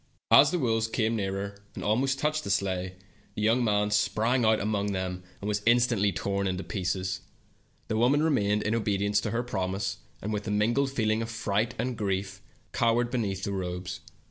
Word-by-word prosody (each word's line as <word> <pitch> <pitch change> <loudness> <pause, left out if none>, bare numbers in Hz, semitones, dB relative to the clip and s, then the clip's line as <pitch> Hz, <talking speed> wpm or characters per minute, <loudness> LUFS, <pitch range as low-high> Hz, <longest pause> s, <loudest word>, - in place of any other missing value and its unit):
As 140 - +8
the 180 - 0
wolves 115 -6 +1
came 115 0 0
nearer, 100 0 -3
and - - -6
almost 130 +6 +1
touched 155 +2 0
the - - -5
sleigh, 95 -2 -1 0.4
the 105 - -3
young 115 +3 +3
man 105 -2 +1
sprang 115 +4 +2
among 105 -2 +1
them, 95 -1 -3 0.2
and 100 - -5
was 105 -1 0
instantly 120 -4 +4
torn 100 +2 -1
in 95 -1 -1
pieces. 95 -1 -2 0.7
The 110 - -1
woman 135 +6 +3
remained, 105 -9 +2
in 110 - 0
obedience 100 -2 +1
to - - -2
her 120 +1 -1
promise, 95 -4 -2 0.2
and 105 +2 -4
with 105 +1 -3
a - - -1
mingled 115 +7 +2
feel 110 -5 0
ing 110 +1 +1
of 115 - -4
fright 110 -1 -1
and 125 -1 -2
grief 100 -2 -2 0.3
cowered 120 0 +2
beneath 100 -6 -2
the 100 - -2
robes. 90 -1 -4
105 Hz, 185 wpm, -28 LUFS, 100-115 Hz, 0.7 s, As